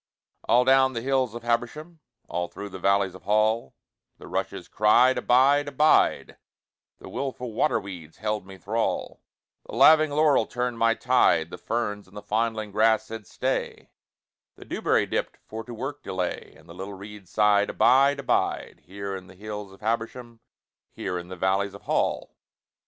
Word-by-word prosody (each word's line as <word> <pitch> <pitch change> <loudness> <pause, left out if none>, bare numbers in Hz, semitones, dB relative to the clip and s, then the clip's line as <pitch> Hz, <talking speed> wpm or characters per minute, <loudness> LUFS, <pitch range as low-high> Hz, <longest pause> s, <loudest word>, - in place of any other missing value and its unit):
All 125 +1 +4
down 130 0 +4
the 115 - -3
hills 130 -3 0
of 120 - -7
Habersham, 135 +8 -2 0.3
All 90 0 -3
through 100 +3 -8
the 95 - -9
valleys 100 0 +2
of 95 - -12
Hall, 110 - +1 0.4
The - - -13
rushes - - -4
cried 120 +5 +4
`Abide, 140 +4 +3
abide,' 150 +2 +2 0.6
The - - -12
willful 125 -4 -5
waterweeds 95 - -2
held 105 -1 -2
me 95 -1 -11
thrall, 105 +6 -2 0.5
The - - -8
laving 155 +4 +6
laurel 145 -5 +3
turned 125 -1 -3
my 115 0 +3
tide, 90 -10 +2
The - - -8
ferns 105 -4 -3
and 100 +2 -14
the 105 - -8
fondling 110 -1 -1
grass 110 +2 +3
said 110 -2 -8
`Stay,' - - -3 0.7
The - - -14
dewberry - - +1
dipped - - -3
for 110 +1 -7
to 125 - -10
work 145 +5 -5
delay, 95 -5 -4
And 80 - -20
the 85 - -11
little 95 +3 -7
reeds 100 -1 -11
sighed 105 -1 +3
`Abide, 140 +2 +4
abide, 140 -2 -1
Here 100 +1 -5
in 95 -1 -9
the - - -15
hills 105 0 -7
of 95 - -17
Habersham, 115 +1 -3 0.5
Here 90 -2 -4
in 85 - -10
the 95 - -8
valleys 95 +2 0
of - - -13
Hall.' - - -1
110 Hz, 165 wpm, -25 LUFS, 100-125 Hz, 0.7 s, laving